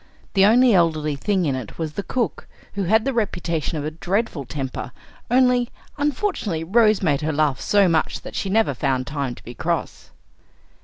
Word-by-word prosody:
The 195 0 +5
only 245 +2 +5
elderly 155 -4 +2
thing 190 +4 0
in 140 - +1
it 130 -5 -6
was 160 -2 -3
the 200 - -3
cook, 240 +3 -3 0.3
who 200 -2 -2
had 220 +5 +3
the 270 - 0
reputation 170 -8 -2
of 145 - -3
a 155 - -2
dreadful 175 - -2
temper; 130 -1 -5 0.4
only, 250 -1 +3 0.3
unfortunately, 290 - -1
Rose 215 +3 +3
made 145 -4 +2
her 155 +1 -1
laugh 145 -3 +1
so 200 -2 +3
much 165 -2 0
that - - -9
she 195 - -2
never 220 +3 +2
found 130 -3 -1
time 140 -2 -3
to - - -16
be 120 - -9
cross. - - -3
175 Hz, 185 wpm, -22 LUFS, 150-220 Hz, 0.4 s, The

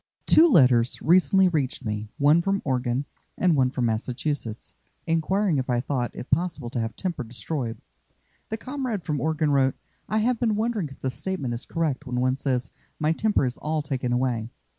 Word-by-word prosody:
Two 335 +2 +6
letters 125 - +4
recently 185 +3 +4
reached 140 -6 -1
me, 105 0 -3
one 150 +4 +5
from 195 +2 -1
Oregon, 125 0 0 0.3
and 180 -3 +3
one 130 -2 +3
from 125 -1 -1
Massachusetts, 120 +1 -3 0.3
inquiring 165 +1 +1
if 130 - -3
I 120 -1 +2
thought 125 -1 -2
it - - -8
possible 165 -9 0
to 125 - -2
have 115 0 -3
temper 175 -8 -3
destroyed. 120 0 -4 0.7
The 220 - -2
comrade 255 -5 -4
from 150 -3 -2
Oregon 155 -1 +1
wrote: 135 -2 +3 0.3
"I 215 - +1
have 235 +2 +1
been 225 -4 +1
wondering 215 -6 -1
if 135 - -14
the 130 - -1
statement 140 -7 -3
is 120 - -4
correct 150 -4 -2
when 125 0 -2
one 130 +1 +2
says, 130 -2 -2 0.3
'My 155 +1 +2
temper 205 -3 +1
is 125 -1 -3
all 155 0 -1
taken 130 -3 -2
away.' 120 -2 0
140 Hz, 185 wpm, -25 LUFS, 125-175 Hz, 0.7 s, Two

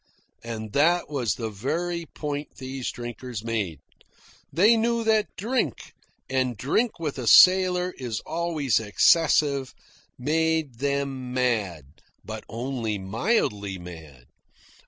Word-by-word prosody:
And 110 -2 -6
that 165 +3 +2
was 120 -9 0
the 115 -2 -4
very 165 - -3
point 145 0 -5
these 130 -1 -5
drinkers 120 -2 -6
made. 105 -10 -3 0.7
They 210 +7 +5
knew 230 +1 +1
that 220 -2 +2
drink 240 +6 -2 0.3
and 130 -3 0
drink 215 - 0
with 150 -5 -4
a 120 - -4
sailor 185 +1 +6
is 120 -4 -3
always 155 -8 0
excessive 140 - +3 0.4
made 155 -2 0
them 140 -2 -2
mad, 110 - 0 0.4
but - - -6
only 115 -3 -3
mildly 100 - -1
mad. 80 -8 -11
130 Hz, 115 wpm, -25 LUFS, 110-165 Hz, 0.7 s, sailor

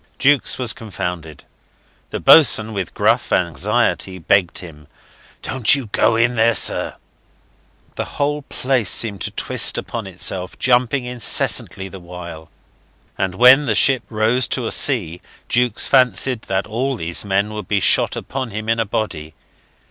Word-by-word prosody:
Jukes 140 -2 +1
was 125 -4 -3
confounded. 90 -8 -7 0.6
The - - -5
boatswain, 110 -8 +5
with 95 -4 -5
gruff 115 +4 0
anxiety, 95 +3 0
begged 90 0 0
him, 75 -5 -10 0.6
"Don't 130 0 +2
you 130 -6 -7
go 115 - +2
in 115 +2 +1
there, 115 0 +2
sir." - - 0 1.0
The - - -3
whole 145 +1 -1
place 130 -4 -2
seemed 105 -4 +1
to - - -1
twist - - +1
upon 115 -4 -6
itself, 90 0 -4
jumping 125 +1 +1
incessantly 120 -5 +1
the 95 0 -11
while; 85 -2 -11 0.7
and 95 -1 -3
when 130 +6 +6
the 110 - 0
ship 135 +2 +3
rose 110 +3 +1
to 125 - -2
a - - -3
sea 90 - +2 0.3
Jukes 125 -2 0
fancied 130 -2 +2
that 95 0 -1
all 125 +5 -3
these 85 -5 -3
men 100 +1 -1
would 105 0 -7
be 100 - 0
shot - - +3
upon 130 -2 -5
him 110 +1 -6
in 115 0 0
a 115 - 0
body. 80 -8 -5
110 Hz, 150 wpm, -18 LUFS, 95-125 Hz, 1.0 s, when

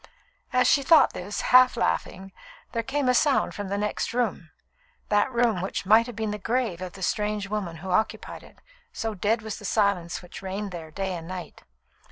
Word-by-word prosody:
As 250 0 +3
she 280 - +4
thought 315 +3 +5
this, 200 +3 -4
half 255 0 +7
laughing, 185 - -2 0.4
there 230 - -1
came 270 +3 -1
a 250 - +4
sound 280 +2 +2
from 205 -1 -5
the 200 +1 -2
next 210 +2 -2
room 220 -9 -1 0.6
that 205 +4 +2
room 235 -6 +1
which 190 0 -3
might 220 +4 +5
have 245 - -8
been 220 -2 -2
the 210 - -4
grave 225 -5 -1
of 185 -1 -6
the 195 -1 -8
strange 210 +1 -1
woman 195 -5 -3
who 190 - -3
occupied 215 +5 -1
it, - - -17 0.3
so 225 - -3
dead 215 +3 0
was 220 -1 -5
the - - -13
silence 200 -5 0
which 180 - -10
reigned 195 +1 -4
there 165 -3 -7
day 190 +3 -3
and 165 -1 -7
night. 180 -1 -8
210 Hz, 200 wpm, -26 LUFS, 185-230 Hz, 0.6 s, half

